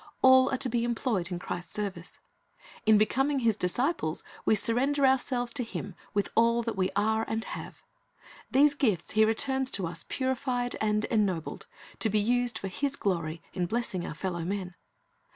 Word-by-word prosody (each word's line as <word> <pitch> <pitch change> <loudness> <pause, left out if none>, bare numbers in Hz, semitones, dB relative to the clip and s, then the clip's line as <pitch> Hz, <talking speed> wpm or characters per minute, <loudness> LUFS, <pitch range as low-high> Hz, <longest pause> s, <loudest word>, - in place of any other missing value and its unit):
All 260 0 +7
are 265 - 0
to 255 - 0
be 240 -1 0
employed 225 -6 -1
in 175 - -2
Christ's 175 -1 -6
service. 195 -4 -5 0.7
In 220 -1 +7
becoming 270 +7 +2
His 225 -3 +3
disciples, 190 - -1 0.2
we - - +4
surrender 270 +7 +2
ourselves 250 -2 +1
to 255 - 0
Him 205 -3 -6 0.2
with 205 - +1
all 235 +1 +3
that 230 -1 -3
we 185 -1 +1
are 220 +2 +2
and 225 0 -1
have. - - -8 0.7
These 285 +2 +5
gifts 215 - 0
He 220 +1 +4
returns 265 +4 +1
to 190 - -2
us 165 0 -5
purified 255 -2 -1
and 215 0 +1
ennobled, 195 -8 -1 0.3
to 220 - +3
be 215 - +1
used 245 +2 +1
for 195 - -5
His 275 +9 -1
glory 165 -6 -2
in 180 -2 -1
blessing 220 -4 -2
our - - -6
fellow 175 +1 -3
men. 185 0 -3
220 Hz, 170 wpm, -29 LUFS, 190-255 Hz, 0.7 s, All